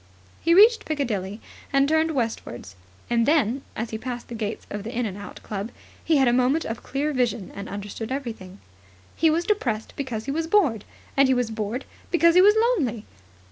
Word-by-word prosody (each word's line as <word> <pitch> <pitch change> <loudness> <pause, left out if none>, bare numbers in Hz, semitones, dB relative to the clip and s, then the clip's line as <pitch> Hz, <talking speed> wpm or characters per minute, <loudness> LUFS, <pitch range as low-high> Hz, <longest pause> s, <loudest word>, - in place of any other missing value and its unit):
He 335 +1 +4
reached 445 +4 +7
Piccadilly 215 -9 -2 0.3
and 275 -1 +3
turned 315 +1 +2
westwards. 225 - -4 0.3
And 235 -1 +2
then, 275 -4 +2
as 225 +1 -4
he 220 - -4
passed 245 0 -6
the - - -6
gates 220 -2 -4
of 205 - -4
the 225 - -5
In 245 0 -1
and 195 -4 -4
Out 205 0 -10
Club, 205 +1 -4 0.3
he 320 - +3
had 265 -2 +4
a 240 - +4
moment 255 +6 +2
of 225 +1 -4
clear 290 +2 -2
vision 235 -6 -1
and 200 0 -7
understood 205 +3 -6
everything. 225 -9 -5 0.6
He 325 - +3
was 335 +2 +1
depressed 235 - -1
because 245 -6 -4
he 275 - -2
was 320 +3 -1
bored, 305 - +2 0.3
and 275 0 +5
he 260 - +3
was 245 -2 0
bored 220 +4 -3 0.2
because 335 -1 +4
he 365 - +7
was 415 +2 +6 0.2
lonely. 235 -7 -2
245 Hz, 195 wpm, -24 LUFS, 220-300 Hz, 0.6 s, reached